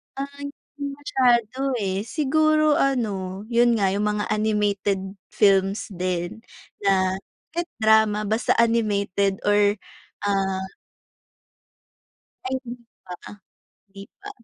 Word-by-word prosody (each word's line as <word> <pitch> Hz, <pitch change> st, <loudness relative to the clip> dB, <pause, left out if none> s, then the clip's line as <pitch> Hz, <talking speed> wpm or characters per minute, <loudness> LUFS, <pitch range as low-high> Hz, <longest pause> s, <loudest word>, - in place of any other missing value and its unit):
Ay 280 Hz, +1 st, -6 dB, 0.3 s
di 285 Hz, -, -4 dB
masyado, 260 Hz, -2 st, +1 dB
eh, 195 Hz, +2 st, -2 dB
siguro 310 Hz, +1 st, +2 dB
ano, 200 Hz, -8 st, -1 dB
yun 240 Hz, 0 st, +4 dB
nga, 200 Hz, -3 st, +2 dB
yung 200 Hz, +2 st, -1 dB
mga 210 Hz, 0 st, -3 dB
animated 205 Hz, -2 st, 0 dB, 0.2 s
films 195 Hz, -1 st, +2 dB
din 180 Hz, -1 st, -3 dB, 0.5 s
na 190 Hz, -1 st, +2 dB, 0.3 s
kahit 345 Hz, +1 st, -3 dB, 0.2 s
drama 220 Hz, -1 st, +4 dB
basta 220 Hz, +3 st, +1 dB
animated 200 Hz, -4 st, +1 dB
or 205 Hz, 0 st, +3 dB, 0.5 s
ah. 195 Hz, -1 st, -1 dB, 1.8 s
Ay 260 Hz, 0 st, -1 dB
hindi 240 Hz, 0 st, -8 dB, 0.2 s
pa, 180 Hz, -, -7 dB, 0.8 s
hindi 195 Hz, 0 st, -11 dB, 0.2 s
pa. 410 Hz, +1 st, -9 dB
210 Hz, 105 wpm, -23 LUFS, 195-250 Hz, 1.8 s, yun